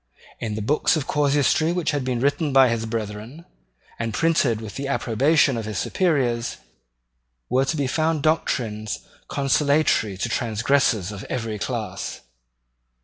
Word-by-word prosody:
In 110 -2 -3
the 110 - -3
books 145 +8 +2
of 155 -4 -2
casuistry 145 +2 +2
which 175 -2 0
had 145 -3 -1
been 125 -2 -1
written 145 +3 +1
by 135 -1 +6
his 115 -1 -2
brethren, 110 +7 -5 0.5
and 115 -1 -2
printed 155 -9 +2
with 110 -3 -8
the 140 +6 -4
approbation 135 +1 +2
of 115 - -4
his 105 -2 -4
superiors, 130 - 0 0.9
were 130 +2 +3
to 160 +4 -1
be 140 - 0
found 155 +2 0
doctrines 110 -9 -1 0.2
consolatory 140 -7 +2
to 95 - -1
transgressors 115 -3 +1
of 100 0 -7
every 110 -3 -4
class. 105 -6 -4
125 Hz, 145 wpm, -23 LUFS, 110-145 Hz, 0.9 s, by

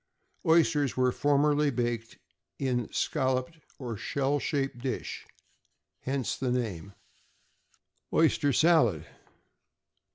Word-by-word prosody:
Oysters 160 -5 +3
were 130 0 +3
formerly 145 +2 +2
baked 120 -3 -3 0.4
in 130 -3 0
a 120 - -7
scalloped 130 +5 -1 0.2
or 120 -4 -5
shell 140 +6 -1
shaped 135 -4 -2
dish, 130 +1 -4 0.7
hence 130 -4 -2
the 130 - -2
name. 100 -6 -3 1.2
=Oyster 150 -3 +3
Salad. 125 - +3
130 Hz, 95 wpm, -29 LUFS, 120-145 Hz, 1.2 s, Oysters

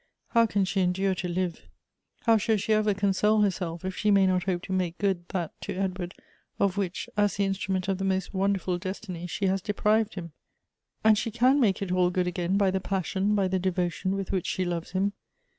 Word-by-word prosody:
How 230 -1 +4
can 200 -2 +1
she 190 +1 0
endure 190 +2 +1
to 180 0 -3
live? 180 0 -2 0.6
How 225 -1 +5
shall 220 +1 +1
she 215 +2 0
ever 215 -1 +2
console 205 +2 +2
herself, 180 -4 -1
if 190 0 -3
she 210 - 0
may 200 -1 +5
not 185 -1 +1
hope 180 -2 -1
to 190 - -4
make 180 -2 -1
good 190 -4 -1
that 175 -4 -3
to 200 - -4
Edward, 185 -1 -3 0.4
of 195 -2 +2
which, 190 -3 -2
as 205 -2 +2
the 200 - +2
instrument 195 -1 -1
of 195 -1 0
the - - -2
most 190 -1 -1
won 195 +1 +2
derful 180 -2 -2
destiny, 185 -2 -5
she 195 +3 -2
has 190 0 +1
deprived 215 +2 +1
him? 170 -3 -6 0.7
And 215 -1 +5
she 230 - -2
can 250 +5 +3
make 200 -6 +2
it 185 - -4
all 180 -1 +3
good 180 0 0
again 180 +1 0
by 200 -2 +3
the 190 - 0
passion, 195 +2 0
by 195 -2 +2
the 190 0 0
devotion 185 +1 -1
with 195 -1 -3
which 190 -3 -1
she 185 - -1
loves 175 0 -4
him. 195 +2 +1
190 Hz, 220 wpm, -27 LUFS, 180-200 Hz, 0.7 s, How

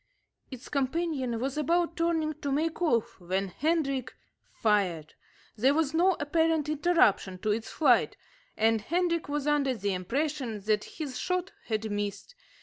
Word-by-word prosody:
Its 255 -2 -9
companion 275 -3 -1
was 270 +4 -2
about 335 +2 +1
turning 330 -2 0
to 285 -1 -4
make 315 +4 -1
off 240 - +1
when 190 +2 -2
Hendrik 275 - -1 0.4
fired. 185 -8 0 0.4
There 260 +6 +3
was 315 -2 +1
no 360 +4 +4
apparent 320 +1 +1
interruption 300 - +2
to 215 +3 -1
its 220 +2 -2
flight, 315 - +3 0.4
and 225 0 +3
Hendrik 335 - 0
was 290 -1 -2
under 290 -3 +2
the 205 -3 -1
impression 245 - -2
that 210 +1 0
his 285 -5 -6
shot 365 +1 -1
had 220 -1 -2
missed. 205 - -4
275 Hz, 145 wpm, -29 LUFS, 215-320 Hz, 0.4 s, no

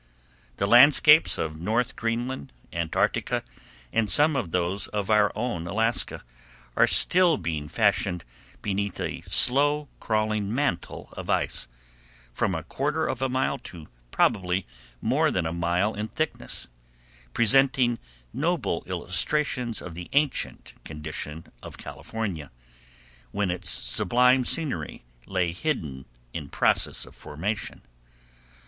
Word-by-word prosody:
The 100 - 0
landscapes 145 +7 +6
of 80 -1 -4
North 115 +6 -1
Greenland, 115 - -3 0.2
Antarctica, 85 -1 -1 0.5
and 110 -2 +1
some 150 +1 +5
of 115 -10 -2
those 90 +3 -1
of 105 0 -3
our 105 -1 +4
own 110 -8 -3
Alaska, 115 +5 -1 0.5
are - - +4
still 175 -3 +5
being 80 -4 -4
fashioned 95 -1 0 0.4
beneath 100 -1 -2
a - - -4
slow 145 +3 +4
crawling 110 -2 -1
mantle 140 -10 -2
of - - -8
ice, - - 0 0.7
from 90 - -1
a 80 - -4
quarter 150 - -2
of 130 - -3
a 135 - 0
mile 130 +1 -1
to 85 -3 -11 0.2
probably 90 +6 +1 0.4
more - - +2
than 90 -3 -1
a 80 - -2
mile 85 +5 0
in 105 +1 -4
thickness, 155 +7 -4 0.7
presenting 120 0 +4 0.3
noble - - -1
illustrations 130 -7 -1
of 90 - -8
the 90 +1 -8
ancient 145 0 -1
condition 75 0 -7 0.2
of - - -10
California, 95 -11 -6 0.8
when 100 +1 -1
its 90 - 0
sublime 125 - +4
scenery 130 - -1 0.2
lay 90 -3 0
hidden 80 - -4 0.3
in 75 -5 -6
process - - +1
of - - -15
formation. 95 +9 -5
105 Hz, 120 wpm, -25 LUFS, 85-125 Hz, 0.8 s, landscapes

